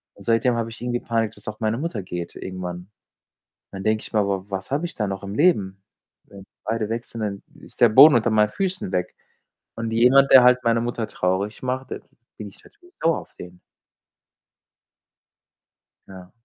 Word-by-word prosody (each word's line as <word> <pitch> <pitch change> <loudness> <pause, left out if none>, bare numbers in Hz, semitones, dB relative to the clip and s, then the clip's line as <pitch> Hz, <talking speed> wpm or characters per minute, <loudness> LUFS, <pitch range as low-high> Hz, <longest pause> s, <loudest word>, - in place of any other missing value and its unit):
und - - -15
seitdem 120 +2 +2
habe 115 -1 -3
ich 115 - -12
irgendwie 120 0 -2
Panik, 115 -3 -1
dass 105 - -15
auch 105 +1 -6
meine 110 0 -1
Mutter 135 -8 -4
geht 90 -2 -7
irgendwann. 90 0 -7 0.8
Dann 95 0 -8
denke 110 0 +1
ich - - -12
mir: 110 - +1
„Aber 100 0 -2
was 95 +4 -5
habe 150 +5 0
ich - - -9
dann 105 -3 -2
noch 95 0 -5
im 100 +1 -6
Leben? 100 - +1 0.4
Wenn 100 -1 -14 0.2
beide 110 0 -2
weg 115 +1 -3
sind, 115 - -9
dann 100 -2 -4 0.2
ist - - -14
der 120 - +7
Boden 140 +4 +8
unter 120 0 +1
meinen 105 -1 +3
Füßen 185 - -3
weg.“ 90 -1 -2 0.6
Und 115 -1 -4
jemand, 125 +4 +4
der 130 -2 +9
halt 125 0 +4
meine 115 0 +2
Mutter 120 -1 -3
traurig 100 +3 -2
macht, 130 +1 -4
da - - -4 0.4
bin 105 -1 -8
ich 95 - -18
natürlich 365 -3 -22
sauer 165 0 +1
auf - - -16
den. 90 0 -11 2.5
Ja. 95 -1 -13
110 Hz, 190 wpm, -22 LUFS, 95-125 Hz, 2.5 s, der